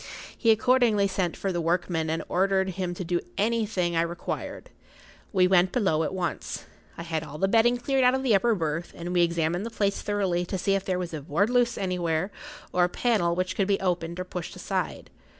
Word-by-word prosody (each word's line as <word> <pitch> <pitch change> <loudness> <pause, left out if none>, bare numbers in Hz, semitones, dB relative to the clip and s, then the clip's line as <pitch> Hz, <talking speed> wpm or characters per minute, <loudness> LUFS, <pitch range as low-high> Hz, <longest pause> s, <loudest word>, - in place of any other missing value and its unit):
He 230 - +1
accordingly 225 -2 +4
sent 185 -3 -2
for 195 - -2
the 175 -1 -1
workman 165 -1 0
and 160 +1 -1
ordered 190 +1 +1
him 180 -1 -3
to 185 - -4
do 175 0 0 0.2
anything 210 -6 0
I 165 - +3
required. 170 0 -5 0.6
We 185 -3 +4
went 185 0 +4
below 190 -10 +1
at 160 - -1
once. 185 -2 -4 0.3
I 170 - -5
had 165 -2 -2
all 150 -1 -8
the 195 - +2
bedding 230 +4 +4
cleared 265 +2 +1
out 250 +1 +5
of 265 - -2
the 250 -4 +3
upper 225 +3 +3
berth, 165 -1 -3
and 175 +1 -5
we 175 - +4
examined 170 +1 +1
the[Pg 230 - -4
54] - - -19
place 200 -1 +1
thoroughly 195 -4 0
to 190 - -3
see 195 +2 +1
if 195 -1 0
there 185 -1 0
was 180 -2 -4
a 155 - -4
board 200 - +1
loose 245 -1 +2
anywhere, 180 -1 -1 0.4
or 180 -1 +4
a - - -2
panel 185 -5 +1
which 185 +1 -1
could 195 - +1
be 200 -1 +2
opened 175 -2 -2
or - - -1
pushed 180 -2 -6
aside. - - -3
185 Hz, 220 wpm, -27 LUFS, 170-205 Hz, 0.6 s, out